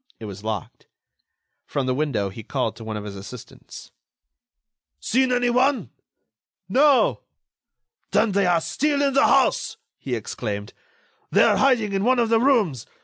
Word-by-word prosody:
It 110 - -8
was 100 -1 -9
locked. 110 -4 -6 0.8
From 140 -3 -2
the 130 - 0
window 125 -8 -1
he 105 +4 -9
called 110 +1 -3
to 115 - -10
one 110 -1 -5
of 105 - -6
his 100 -1 -8
assistants: 100 +5 -11 1.1
"Seen 255 - +1
anyone?" 250 +2 +1 0.8
"No." 280 0 +3 0.9
"Then 225 - +2
they 195 -1 +1
are 170 -2 +2
still 285 - 0
in 275 -1 +1
the 275 - +4
house!" - - +2 0.2
he 130 -3 -3
exclaimed. 105 -2 -5 0.6
"They - - +4
are - - +3
hiding 240 -7 +2
in 195 0 0
one 255 +3 +3
of 235 -2 +1
the 225 0 +3
rooms! 220 - +1
180 Hz, 150 wpm, -23 LUFS, -, 1.1 s, the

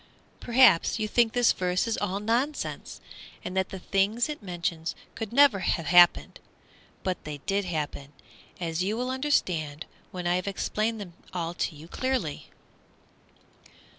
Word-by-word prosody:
PERHAPS 235 -9 +4
you 215 -1 -1
think 230 +1 +2
this 245 -1 +4
verse 180 0 0
is 230 - 0
all 200 -1 -2
nonsense, 240 +8 -2 0.5
and 180 - -5
that 190 0 0
the 190 - -6
things 200 +7 +1
it 300 - -5
mentions 170 -3 -3 0.2
could 225 -3 -5
never 270 -5 +5
have 170 -2 -1
happened; 175 +2 +5 0.6
but 185 -2 -2
they 150 -1 -6
did 200 0 0
happen, 150 -4 -4 0.5
as 165 -1 -2
you 210 +4 -1
will 250 +1 -2
understand 175 - 0 0.2
when 180 -1 -6
I 175 +1 +2
have 185 - -4
explained 215 +3 -1
them 185 -4 -8 0.2
all 170 -1 -2
to 165 - -2
you 155 +2 -12
clearly. 250 - -2
190 Hz, 150 wpm, -27 LUFS, 175-230 Hz, 0.6 s, never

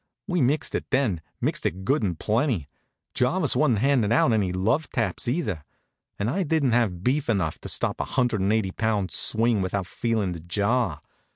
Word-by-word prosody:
We 180 -4 0
mixed 140 +5 +1
it - - -3
then, 125 - +1 0.2
mixed - - -1
it 95 +3 -2
good 140 +4 +2
and 90 -6 -1
plenty. 110 - 0 0.5
Jarvis - - +1
wa'n't 115 - +3
handin' 120 -2 +2
out 120 0 +4
any 100 -4 +1
love 110 - 0
taps, - - -2
either; 120 - -1 0.5
and 100 - -1
I 180 +11 0
didn't 155 -6 +1
have 105 -7 +1
beef 135 +3 0
enough 90 -8 0
to - - -7
stop - - -1
a - - -2
hundred 120 -5 0
an' 100 +2 +2
eighty 110 -4 +1
pound 105 -4 -1
swing 115 +3 +2
without 95 0 -2
feelin' 110 -1 -1
the 85 - -6
jar. 95 -1 0
110 Hz, 185 wpm, -25 LUFS, 95-130 Hz, 0.5 s, out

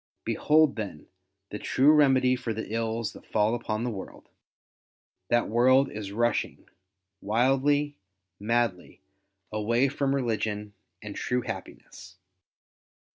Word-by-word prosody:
Behold, 155 -3 +3
then, 100 -9 -6 0.5
the 105 - -5
true 140 +3 +4
remedy 130 -4 +4
for 125 -3 -4
the 110 0 -5
ills 115 0 -2
that - - -13
fall 105 +1 +1
upon 115 -2 -2
the 125 - -1
world. 95 -3 -9 1.0
That 120 0 +2
world 130 +4 +4
is 105 -2 -6
rushing 120 +3 -1 0.5
wildly, 135 +6 +1 0.4
madly, 115 -3 -1 0.5
away 115 +5 +1
from 140 0 0
religion 110 -5 -2 0.3
and - - -7
true 125 0 -1
happiness. 95 -5 -9
120 Hz, 115 wpm, -27 LUFS, 110-130 Hz, 1.0 s, true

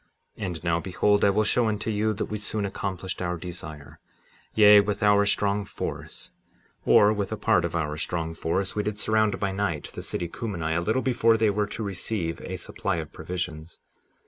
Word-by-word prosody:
57:8 105 - -4
And 85 -3 -5
now 85 -1 +1
behold, 100 +4 +2
I 100 - +6
will 105 +2 +2
show 115 +2 +2
unto 110 +1 -1
you 110 +1 +1
that 105 - -2
we 105 - -5
soon 105 0 -1
accomplished 95 -2 -4
our 90 -1 -1
desire; 75 -5 -9 0.6
yea, 105 -1 +8
with 100 +1 0
our 100 -1 +5
strong 100 0 +1
force, 100 - -6 0.5
or 105 +1 +6
with 100 -1 -3
a 110 - -2
part 90 - +3
of 85 -1 -2
our 75 -3 -1
strong 80 0 -3
force, 90 +4 -1
we 105 - +1
did 105 0 -3
surround, 110 0 +1
by 100 -1 0
night, 95 -6 -2
the - - -6
city 85 - -3
Cumeni, 85 -5 -3
a 85 - +1
little 110 +8 0
before 115 -3 +3
they 110 -1 +3
were 105 0 0
to 110 - -5
receive 95 -3 -3
a - - -5
supply 100 - -3
of 80 -2 -5
provisions. 85 -1 -5
100 Hz, 200 wpm, -26 LUFS, 85-105 Hz, 0.6 s, yea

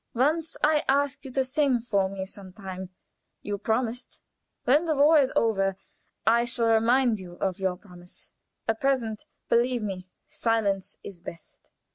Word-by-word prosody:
Once 315 +6 +1
I 300 0 +4
asked 280 +1 +1
you 265 - -7
to 265 - +2
sing 260 -1 +2
for 200 -5 0
me 190 -1 -5
some 190 -1 -11
time: 190 -2 -7 0.5
you 205 -1 -3
promised. 230 +3 -1 0.4
When 295 +7 +3
the 310 - +2
war 300 +3 +6
is 270 -2 +2
over 195 -4 +2 0.5
I 230 +2 +4
shall 235 -1 +1
remind 235 0 +3
you 180 -2 -9
of 190 +1 -2
your 190 -1 0
promise. 180 -2 -12 0.4
At 225 0 -1
present, 245 -6 0 0.2
believe 240 0 +2
me, 185 -3 -5 0.2
silence 205 -4 -1
is 195 -4 -9
best. 170 -1 -12
225 Hz, 155 wpm, -27 LUFS, 195-265 Hz, 0.5 s, war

